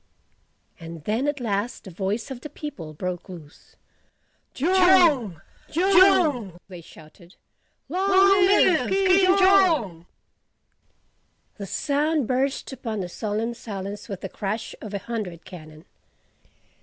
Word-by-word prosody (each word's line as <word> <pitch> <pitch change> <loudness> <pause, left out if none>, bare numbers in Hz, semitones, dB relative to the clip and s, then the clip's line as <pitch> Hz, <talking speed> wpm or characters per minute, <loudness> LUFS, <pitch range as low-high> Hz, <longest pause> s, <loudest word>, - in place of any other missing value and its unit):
And 165 -1 -10
then 225 - -1
at 290 -1 -2
last 225 0 -3
the 190 - -11
voice 200 +7 -4
of 250 -2 -7
the 300 - -8
people 285 - -8
broke 180 +3 -5
loose. 160 -5 -14 0.8
"JONG! 340 - +3 0.3
JONG!" 335 - +3
they 180 -3 -11
shouted, 165 +3 -17 0.5
"LONG 370 +7 -1 0.4
LIVE 375 -4 +3
KING 380 0 +3
JONG!" 335 - +3 1.5
The 200 - -7
sound 295 - -1
burst 265 +2 -2
upon 225 -5 -5
the 180 - -5
solemn 215 +5 -3
silence 205 -2 -8
with 195 -2 -6
the 190 - -6
crash 210 +4 -5
of 210 -2 -7
a 200 - -6
hundred 210 -8 -6
cannon. 155 -4 -13
230 Hz, 120 wpm, -24 LUFS, 185-310 Hz, 1.5 s, JONG